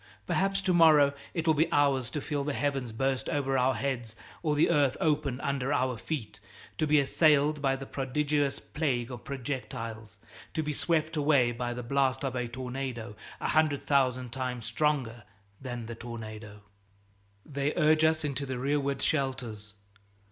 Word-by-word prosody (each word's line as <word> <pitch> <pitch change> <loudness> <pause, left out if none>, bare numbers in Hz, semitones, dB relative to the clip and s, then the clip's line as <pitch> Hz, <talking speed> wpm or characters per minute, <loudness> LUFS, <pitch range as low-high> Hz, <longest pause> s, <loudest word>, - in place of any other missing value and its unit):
Perhaps 195 0 +1
to 190 -2 +1
morrow 155 -4 +6 0.2
it 165 -1 -1
will 160 - +5
be 160 +2 +1
ours 140 -4 +2
to 150 - -4
feel 145 0 -2
the 145 0 -2
heavens 135 -4 -1
burst 135 +3 -1
over 135 -2 0
our 130 0 +3
heads 120 -2 -3 0.3
or 150 -3 +1
the 150 +3 +4
earth 145 -5 +3
open 145 -4 0
under 140 -1 -1
our 130 -3 +1
feet, 120 0 -5 0.4
to 155 - +2
be 150 0 +5
assailed 150 +1 +3
by 135 -2 +2
the 135 0 -7
prodigious 145 +1 0
plague 130 -6 -2
of 120 -3 -8
projectiles, 115 -5 -5 0.4
to 160 - 0
be 150 0 -2
swept 160 +1 0
away 140 -5 +3
by 120 +1 -3
the 120 0 -5
blasts 130 +1 +1
of 135 -2 -2
a 125 -1 -1
tornado 125 -2 -5 0.2
a - - -2
hundred 155 -2 +2
thousand 130 -3 +1
times 125 -2 -3
stronger 135 -7 0 0.4
than 120 -3 -5
the 115 - -6
tornado. 110 -3 -8 0.8
They 140 0 -2
urge 155 -1 +4
us 160 0 +3
into 140 -1 -2
the 130 -1 -3
rearward 140 +1 0
shelters. 120 -8 -2
135 Hz, 165 wpm, -29 LUFS, 125-150 Hz, 0.8 s, morrow